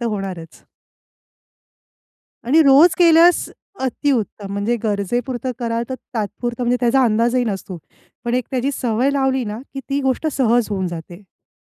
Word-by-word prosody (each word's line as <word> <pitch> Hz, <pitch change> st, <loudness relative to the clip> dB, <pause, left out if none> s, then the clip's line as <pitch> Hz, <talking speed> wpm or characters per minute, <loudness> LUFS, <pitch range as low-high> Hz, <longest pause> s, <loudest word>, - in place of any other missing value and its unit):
तर -, -, -3 dB
होणारच. 185 Hz, -5 st, -7 dB, 1.8 s
आणि 300 Hz, +7 st, +4 dB
रोज 290 Hz, +5 st, +6 dB
केल्यास 340 Hz, 0 st, +5 dB, 0.3 s
अतिउत्तम 245 Hz, -6 st, -2 dB
म्हणजे 205 Hz, +4 st, -1 dB
गरजेपुरतं 240 Hz, +5 st, -2 dB
कराल 230 Hz, -1 st, -2 dB
तर 260 Hz, -, -3 dB, 0.2 s
तात्पुरतं 235 Hz, +3 st, -3 dB
म्हणजे 245 Hz, +1 st, +2 dB
त्याचा 250 Hz, +2 st, +3 dB
अंदाजही 235 Hz, +2 st, +2 dB
नसतो. 195 Hz, -4 st, -5 dB, 0.5 s
पण 240 Hz, +1 st, -1 dB
एक 250 Hz, -2 st, 0 dB
त्याची 260 Hz, +1 st, -1 dB
सवय 245 Hz, +2 st, 0 dB
लावली 265 Hz, -2 st, 0 dB
ना, 210 Hz, +1 st, -5 dB, 0.2 s
की 270 Hz, -, -4 dB
ती 280 Hz, +1 st, 0 dB
गोष्ट 265 Hz, +3 st, 0 dB
सहज 240 Hz, -3 st, +2 dB
होऊन 190 Hz, -2 st, -1 dB
जाते. 170 Hz, 0 st, -7 dB
म्हणजे 190 Hz, -1 st, -25 dB
240 Hz, 145 wpm, -19 LUFS, 210-265 Hz, 1.8 s, रोज